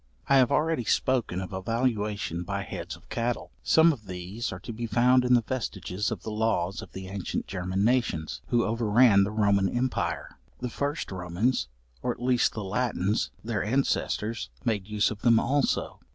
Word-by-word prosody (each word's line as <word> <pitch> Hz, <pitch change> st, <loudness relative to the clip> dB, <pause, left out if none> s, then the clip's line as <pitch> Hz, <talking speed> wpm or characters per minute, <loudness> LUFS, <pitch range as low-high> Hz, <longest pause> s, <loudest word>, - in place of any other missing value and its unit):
I 140 Hz, -, +5 dB
have 130 Hz, -2 st, +4 dB
already 160 Hz, -4 st, +2 dB
spoken 115 Hz, -6 st, +1 dB
of 95 Hz, +1 st, -6 dB
a 95 Hz, -, -3 dB
valuation 105 Hz, -5 st, -1 dB
by 90 Hz, -, -3 dB
heads -, -, -6 dB
of -, -, -19 dB
cattle; 120 Hz, +1 st, -2 dB
some 160 Hz, +1 st, +5 dB
of 110 Hz, -7 st, -12 dB
these 90 Hz, +6 st, -4 dB
are 95 Hz, -, -6 dB
to 110 Hz, +4 st, -6 dB
be 115 Hz, +2 st, -4 dB
found 125 Hz, +3 st, +4 dB
in 125 Hz, 0 st, +4 dB
the 120 Hz, -, +3 dB
vestiges 105 Hz, -5 st, -3 dB
of -, -, -5 dB
the 110 Hz, -, -4 dB
laws 105 Hz, -4 st, 0 dB
of -, -, -12 dB
the 95 Hz, 0 st, -7 dB
ancient 95 Hz, -1 st, -3 dB
German 95 Hz, +1 st, -2 dB
nations, 115 Hz, -11 st, 0 dB
who 120 Hz, -1 st, +2 dB
over 115 Hz, 0 st, -1 dB
ran 105 Hz, -3 st, +6 dB
the 100 Hz, -, -1 dB
Roman 100 Hz, -3 st, +2 dB
empire. 85 Hz, -, -2 dB, 0.2 s
The 125 Hz, -1 st, -4 dB
first 145 Hz, 0 st, -2 dB
Romans, 90 Hz, -, 0 dB, 0.3 s
or -, -, -2 dB
at -, -, -17 dB
least 125 Hz, 0 st, +2 dB
the 110 Hz, -, -4 dB
Latins, 105 Hz, -1 st, 0 dB
their 110 Hz, -2 st, -1 dB
ancestors, 115 Hz, -, 0 dB, 0.2 s
made 105 Hz, -5 st, 0 dB
use 105 Hz, 0 st, +1 dB
of 105 Hz, -, -7 dB
them 115 Hz, -2 st, +5 dB
also. 140 Hz, +3 st, 0 dB
110 Hz, 185 wpm, -27 LUFS, 95-125 Hz, 0.3 s, ran